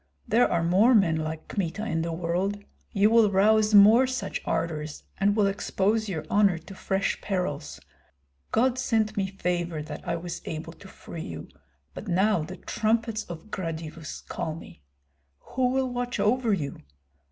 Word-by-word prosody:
There 235 +4 +3
are 170 -1 +1
more 200 +9 +5
men 185 -7 +4
like 155 0 -4
Kmita 200 +2 -3
in 165 -7 -1
the 165 +1 -2
world; 175 +4 -1 0.3
you 205 +1 +3
will 225 -2 +6
rouse 210 +2 +4
more 220 +6 +8
such 255 -7 -3
ardors, 155 -2 -2 0.2
and 200 +1 +3
will 210 -2 +3
expose 200 +2 0
your 160 -5 -4
honor 200 -2 +3
to 165 +4 -11
fresh 195 +1 -1
perils. 180 -7 -3 0.7
God 255 +3 +2
sent 220 -4 +1
me 195 -2 0
favor 175 -4 -2
that 155 - -7
I 170 - 0
was 170 +1 -6
able 160 +1 -5
to 190 - -14
free 170 -3 -9
you, 80 -3 -8 0.4
but - - -8
now 190 +1 +2
the 185 +5 -7
trumpets 225 +2 -1
of 170 +5 -9
Gradivus 165 -3 -5
call 155 - -3
me. 160 - -12 0.6
Who 250 - -1
will 260 0 0
watch 245 0 -3
over 235 +1 +2
you? 155 -8 -2
195 Hz, 165 wpm, -27 LUFS, 165-220 Hz, 0.7 s, more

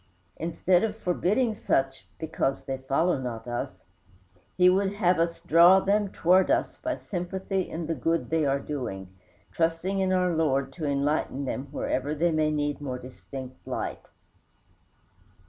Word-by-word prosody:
Instead 175 +3 +1
of 220 -1 -1
forbidding 215 +5 +1
such 135 -10 -1
"because 155 -4 -2
they 135 -1 -4
follow 140 +5 +1
not 120 -3 -5
us," 120 -6 -4 0.7
he 180 0 +6
would 195 +2 +3
have 185 -4 +2
us 170 0 0
draw 170 +4 +7
them 200 +1 +1
towards 185 +2 +3
us - - 0
by 315 -1 -2
sympathy 190 0 -3
in 165 0 -4
the 165 - -1
good 165 +5 -1
they 160 -1 +2
are 140 -1 +2
doing, 95 -11 -5 0.4
trusting 165 +4 0
in 190 -1 +1
our 180 -1 +2
Lord 135 -4 +1
to 155 - -5
enlighten 140 -1 0
them 130 +1 -4
wherever 145 0 -2
they 170 +3 +2
may 155 -1 +2
need 145 -1 -1
more 130 -3 -3
distinct 130 +1 -9
light. - - -3
160 Hz, 150 wpm, -27 LUFS, 135-185 Hz, 0.7 s, draw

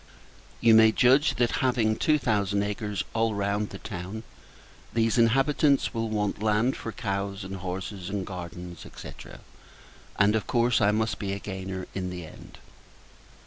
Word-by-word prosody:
You 115 -1 +6
may 110 0 +7
judge 135 +6 +4
that, 120 -1 +1
having 120 -4 +2
two 155 +6 +3
thousand 100 -5 +1
acres 105 -1 -3
all 115 -1 +1
round 100 +1 -1
the - - -8
town, 100 +2 -6 0.7
these 115 +1 +2
inhabitants 135 +4 +3
will 115 -1 -2
want 105 -1 -1
land 110 +4 +2
for 115 - -6
cows 100 -2 -3
and 95 +1 -6
horses, 95 +1 -5
and 100 -1 -3
gardens, 90 -2 -7 0.2
&c. - - -8 1.1
and, 105 +2 +4
of 105 -4 -1
course, 120 -1 +2
I 100 - +5
must 110 +1 0
be 100 -1 -2
a 100 - -4
gainer 95 -1 -5
in 95 -1 -3
the 90 -2 -6
end. - - -13
105 Hz, 155 wpm, -27 LUFS, 95-115 Hz, 1.1 s, may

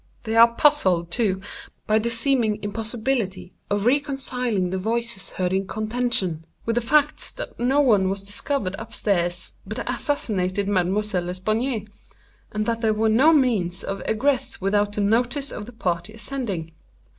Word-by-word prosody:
They 225 0 -2
are 230 +1 +7
puzzled, 185 - +3
too, 190 -3 0 0.4
by 215 +1 +3
the 235 +2 -1
seeming 230 -2 +2
impossibility 215 -3 -2 0.2
of 205 0 0
reconciling 250 -7 0
the 190 - -1
voices 230 0 -3
heard 180 0 -2
in 190 0 0
contention, 215 -7 -1 0.2
with 230 - +1
the 240 - +1
facts 295 +5 +2
that - - -8
no 265 +4 +3
one 205 -8 +4
was 195 0 -3
discovered 205 0 -2
up - - -8
stairs 175 -3 -1
but - - -6
the - - -2
assassinated 200 - 0
Mademoiselle 190 0 0
L'Espanaye, 215 +5 -1 0.6
and 215 0 -1
that 230 0 -1
there 220 -2 +2
were 220 +1 +2
no 260 +9 +6
means 225 - +2
of 195 0 -4
egress 260 +4 0
without 205 +2 +1
the 210 - -1
notice 245 +7 +1
of 210 - -7
the - - -9
party 175 -6 -2
ascending. 210 -8 -4
215 Hz, 155 wpm, -23 LUFS, 190-245 Hz, 0.6 s, are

